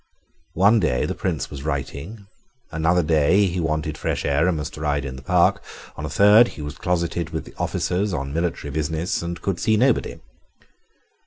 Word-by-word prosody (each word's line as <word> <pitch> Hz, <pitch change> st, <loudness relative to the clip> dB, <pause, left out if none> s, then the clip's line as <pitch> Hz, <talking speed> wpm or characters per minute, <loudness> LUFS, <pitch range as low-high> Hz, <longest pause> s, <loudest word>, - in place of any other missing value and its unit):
One 100 Hz, +6 st, +5 dB
day 65 Hz, -10 st, +1 dB
the -, -, -2 dB
Prince 85 Hz, -8 st, -3 dB
was 70 Hz, -2 st, -7 dB
writing, 80 Hz, -, -5 dB, 0.5 s
another 80 Hz, +3 st, +2 dB
day 80 Hz, +6 st, +3 dB
he 90 Hz, -1 st, -2 dB
wanted 75 Hz, -1 st, -2 dB
fresh -, -, -2 dB
air 70 Hz, +4 st, +2 dB
and 90 Hz, -3 st, +1 dB
must 75 Hz, +1 st, -5 dB
ride 75 Hz, -2 st, -1 dB
in 65 Hz, -1 st, -5 dB
the 65 Hz, -, -9 dB
Park; 70 Hz, -, +2 dB, 0.3 s
on 75 Hz, -, -5 dB
a -, -, -6 dB
third 105 Hz, +8 st, +6 dB
he 75 Hz, -, -6 dB
was 75 Hz, 0 st, -6 dB
closeted 85 Hz, -2 st, -1 dB
with 80 Hz, -1 st, -6 dB
officers 95 Hz, +3 st, -1 dB
on 70 Hz, -4 st, -3 dB
military 80 Hz, -3 st, -2 dB
business 80 Hz, +4 st, -2 dB
and 85 Hz, 0 st, -5 dB
could 95 Hz, -1 st, -2 dB
see 110 Hz, -1 st, +2 dB
nobody. 125 Hz, +2 st, +1 dB
80 Hz, 175 wpm, -22 LUFS, 75-90 Hz, 0.5 s, third